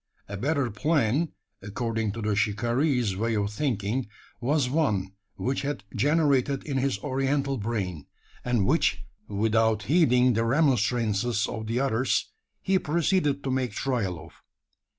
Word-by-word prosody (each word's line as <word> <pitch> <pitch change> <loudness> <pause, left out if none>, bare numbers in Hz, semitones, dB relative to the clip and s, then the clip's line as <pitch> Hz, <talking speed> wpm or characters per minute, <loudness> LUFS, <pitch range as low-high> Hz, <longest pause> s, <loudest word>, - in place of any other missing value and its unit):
A 100 - -6
better 135 +3 0
plan 145 +4 +1 0.3
according 110 +1 -2
to 115 0 -5
the 105 -1 0
shikaree's 120 +2 +1
way 115 +3 -1
of 105 0 -1
thinking 115 -1 -1 0.3
was 140 +2 +1
one 115 - 0 0.2
which 130 +2 -2
had 145 -7 -3
generated 140 +1 +2
in 140 -3 -3
his 135 -4 0
oriental 135 0 0
brain; 100 -8 -3 0.4
and 120 -5 +1
which, - - +1 0.2
without 110 +1 +1
heeding 125 - +4
the 115 +1 +1
remonstrances 120 -4 +1
of 110 -1 -5
the 115 +2 0
others, 130 -1 0 0.3
he 190 -1 +2
proceeded 150 -3 +1
to 135 - -2
make 130 -4 -1
trial 105 -9 -1
of. 80 +2 -12
120 Hz, 135 wpm, -27 LUFS, 105-140 Hz, 0.4 s, heeding